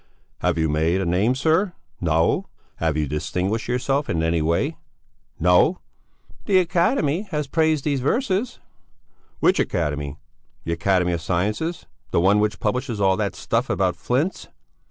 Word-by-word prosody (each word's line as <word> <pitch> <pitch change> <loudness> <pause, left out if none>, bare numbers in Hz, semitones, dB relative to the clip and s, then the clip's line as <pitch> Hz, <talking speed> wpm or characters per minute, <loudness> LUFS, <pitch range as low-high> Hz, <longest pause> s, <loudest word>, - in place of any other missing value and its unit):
"Have - - 0
you 80 -1 +2
made 80 +4 +1
a 95 - -1
name, 95 +9 +2
sir? 165 +7 +1 0.4
No! 80 +1 +2 0.3
Have 80 -2 0
you 75 -1 0
distinguished 90 +9 -2
yourself 135 +4 0
in 80 -1 0
any 80 0 +1
way? 85 +2 0 0.6
No!" 90 - +4 0.7
"The 195 -3 +3
Academy 180 - +1
has 150 -4 -2
praised 155 0 +1
these 145 -3 +1
verses." 215 - 0 0.8
"Which - - +4
Academy? 75 -3 -1 0.5
The 85 - -2
Academy 90 +1 +1
of 85 -1 -2
Sciences? 105 - -2 0.2
The - - +1
one 95 +4 +4
which 105 -2 0
publishes 120 +1 -2
all 95 -1 +3
that 105 -2 -2
stuff 115 +3 -1
about 95 -2 +1
flints?" 130 - -1
105 Hz, 145 wpm, -23 LUFS, -, 0.8 s, No